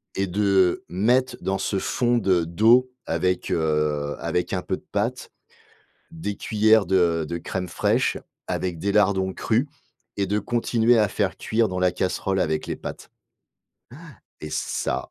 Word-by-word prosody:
et 95 0 0
de, 95 +4 -2
heu, 95 -3 +3
mettre 120 +8 +1
dans 95 0 -1
ce 95 - -1
fond 120 +4 +1
de 95 -6 +2
d'eau 115 +10 +4
avec, 90 -1 -1
heu, 75 -2 0
avec 85 +2 -2
un 90 - 0
peu 95 - -2
de - - -21
pâtes, 115 +5 -2 0.8
des 160 -11 -4
cuillères 110 0 +3
de 85 -3 +2
de 85 +2 -3
crème 90 +2 -4
fraîche - - +1 0.3
avec 90 -3 -3
des 100 +4 -1
lardons 95 -2 +2
crus 115 +7 0 0.5
et 100 - +1
de 105 +2 0
continuer 120 +1 +2
à 105 -1 +4
faire - - -2
cuire 115 0 +1
dans 90 0 -3
la 90 0 +3
casserole 95 +1 -1
avec 80 -3 0
les - - -2
pâtes. - - -8 1.3
Han - - -5
et - - -7
ça, 75 - -2
95 Hz, 165 wpm, -24 LUFS, 90-110 Hz, 1.3 s, d'eau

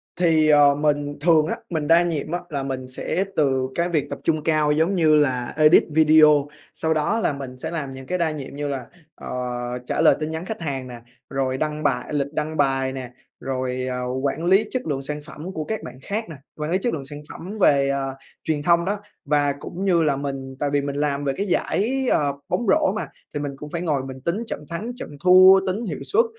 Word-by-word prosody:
Thì, 165 -3 +3
ờ, 145 -1 +6
mình 145 -1 0
thường 160 -2 +4
á, - - -1
mình 155 -3 -2
đa 170 +1 +6
nhiệm 155 -3 -2
á, 175 - -1
là 140 -4 -3
mình 130 -1 -4
sẽ 130 +8 -2
từ 130 -3 +1
cái 170 +1 0
việc 155 -5 0
tập - - -5
trung 155 -2 +1
cao 155 -2 +2
giống 160 +6 +2
như 160 -3 +4
là 130 -5 +1
edit 155 +1 +6
video, 155 -2 +6 0.3
sau 160 0 0
đó 160 +9 +1
là 185 - +1
mình 135 -2 -7
sẽ 160 +6 -5
làm 150 -5 -4
những 130 0 -9
cái 180 - -1
đa 170 -3 +1
nhiệm 140 -2 -7
như 145 0 -3
là, 135 -4 -4 0.3
ờ, - - -10 0.6
trả - - 0
lời - - +6
tin 155 0 -3
nhắn 160 +2 -4
khách 215 -2 -5
hàng 135 -5 -3
nè, 120 -1 -9 0.3
rồi 135 -1 -1
đăng 150 +1 -2
bài 125 +2 -1
lịch 140 0 -1
đăng 155 +1 -3
bài 135 -2 +1
nè, 130 -2 -6 0.3
rồi, 130 -1 -3
ờ, 125 0 -3 0.2
quản 145 +4 -1
lý 190 +5 +4
chất 255 - -2
lượng 140 -3 -1
sản 150 +2 -4
phẩm 155 +4 -8
của 155 - -3
các 220 +7 -4
bạn 130 - -9
khác 215 +6 -3
nè, 160 - -7 0.2
quản 150 +1 -3
lý 185 - +3
chất 235 +5 -1
lượng 140 -4 -4
sản 145 +1 -8
phẩm 195 +5 -8
về, 140 -4 +4
ờ, 135 -1 -2 0.3
truyền 150 -2 -1
thông 170 +1 +3
đó. 205 +2 -1 0.3
Và 145 -1 +2
cũng 185 +6 -5
như 175 -4 +3
là 145 -3 +2
mình 135 -1 -5
tại 145 - 0
vì 145 - +3
mình 140 0 -4
làm 145 -1 -1
về 140 -1 0
cái 200 - -1
giải, 250 +8 0
ờ, 145 -2 +2 0.2
bóng 240 - 0
rổ 305 -5 +3
mà 215 - -3 0.3
thì 145 - -2
mình 145 -1 -3
cũng 150 +2 -8
phải 170 +2 -3
ngồi 150 -6 0
mình 130 0 -8
tính 170 +7 -1
trận 150 - -6
thắng, 200 +8 -4
trận - - -7
thua, 185 +1 +8
tính 205 +6 -2
hiệu 170 - -4
suất, 460 +4 +3
150 Hz, 235 wpm, -23 LUFS, 140-170 Hz, 0.6 s, thua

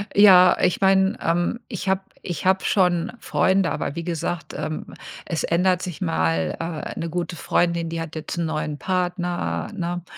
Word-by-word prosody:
Ja, 185 -3 +8
ich 180 - +2
meine, 190 +3 +4
ähm, 175 +7 0
ich 200 -4 -4
habe 190 0 +2 0.2
ich 175 -1 -5
habe 190 +1 +3
schon 180 -2 +2
Freunde, 190 -3 +2
aber 140 - -3
wie 170 - -4
gesagt, 165 -2 -3
ähm, 155 - -5 0.3
es 165 - -2
ändert 180 +2 +2
sich 175 -5 -6
mal, 80 -1 0
äh, 165 -2 -4
'ne 165 - -3
gute 175 +1 -3
Freundin, 170 -1 +1
die 165 0 -3
hat 165 -1 -7
jetzt 155 +2 -5
'n 170 - 0
neuen 155 -2 -3
Partner, 175 - -2
ne? 175 0 -3
175 Hz, 170 wpm, -23 LUFS, 160-185 Hz, 0.3 s, Ja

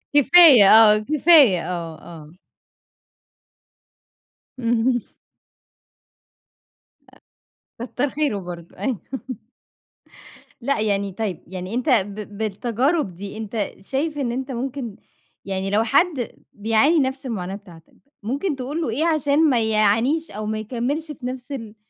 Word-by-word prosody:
كفاية 285 - +8
آه، 215 -1 +8
كفاية 280 - +4
آه، 165 -2 -5
آه. 160 -3 -12 2.3
اهم. 240 0 +1 2.8
أ - - -2
كتر 255 +3 -2
خيره 285 -6 -1
برضه، 175 -2 -10
أيوه. 255 -7 -2 1.6
لأ 275 +1 -1
يعني، 200 -2 -1
طيب 195 -3 -5
يعني 185 +2 -7
أنت 250 +4 -1
ب 205 -3 -1
بالتجارب 230 - -1
دي، 200 +3 -8
أنت 220 -1 -4
شايف 290 +7 -3
إن 260 -5 -2
أنت 265 +2 -4
ممكن 250 -3 -5 0.5
يعني 195 0 -3
لو 210 +3 +2
حد 275 +1 +1 0.2
بيعاني 225 +10 +2
نفس 265 0 -2
المعاناة 195 -6 -4
بتاعتك، 175 -6 -16 0.3
ممكن 280 - -2
تقول 270 +5 -4
له 315 - -2
إيه 270 +9 -1
عشان 310 -1 +2
ما 245 -4 +2
يعانيش 220 +9 +1
أو 215 +1 -6
ما 215 0 -3
يكملش 255 +8 -3
في 260 -3 -10
نفس 255 +1 -6
ال 225 -6 -7
235 Hz, 120 wpm, -22 LUFS, 205-275 Hz, 2.8 s, كفاية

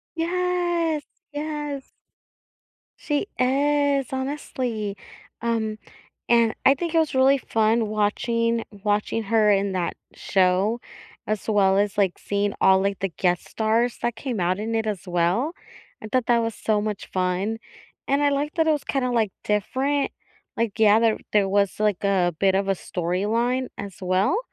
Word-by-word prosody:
Yes. 345 -2 0 0.3
Yes. 295 -2 -4 1.1
She 295 +5 -2
is, 280 +1 +2
honestly. 255 -6 -3 0.4
Um, 220 -2 -1 0.5
and 235 -2 +4
I 270 - +8
think 335 +3 -4
it - - +5
was 320 -3 +1
really 265 +1 +5
fun 225 -1 +1
watching 230 +2 0 0.2
watching 210 +2 0
her 215 0 +3
in 200 -1 +2
that 180 -2 -1 0.2
show 195 +4 +1 0.5
as 215 0 -3
well 195 -3 +3
as, 205 -1 0
like, 195 -3 +1
seeing 205 0 -1
all, 190 0 +5
like, 200 0 -1
the 195 - -1
guest 180 0 -1
stars 230 +2 0
that 240 -1 -1
came 235 -3 -3
out 180 +2 +1
in 225 +2 -3
it 225 -1 0
as 205 -5 -3
well. 180 - +1 0.5
I - - -6
thought 255 -2 +1
that 235 -1 +3
was 225 -1 -2
so 215 0 0
much 210 -1 -4
fun, 185 +4 -1 0.5
and 280 +1 +2
I 290 - +4
like 285 +2 -1
that 320 -1 +2
it 315 - +4
was 295 -2 -2
kinda, 260 -2 -1
like, 225 -4 +1
different, 265 +7 0 0.4
like, 225 -2 -1
yeah, 215 -1 +6
there 225 -1 +2
there 205 -2 +3
was 200 -1 +1
like 210 -4 +1
a 185 -3 +2
bit 195 -1 +3
of 195 0 0
a - - +4
storyline 210 +10 -1
as 200 -2 -7
well, 185 - +1
225 Hz, 160 wpm, -24 LUFS, 200-265 Hz, 1.1 s, I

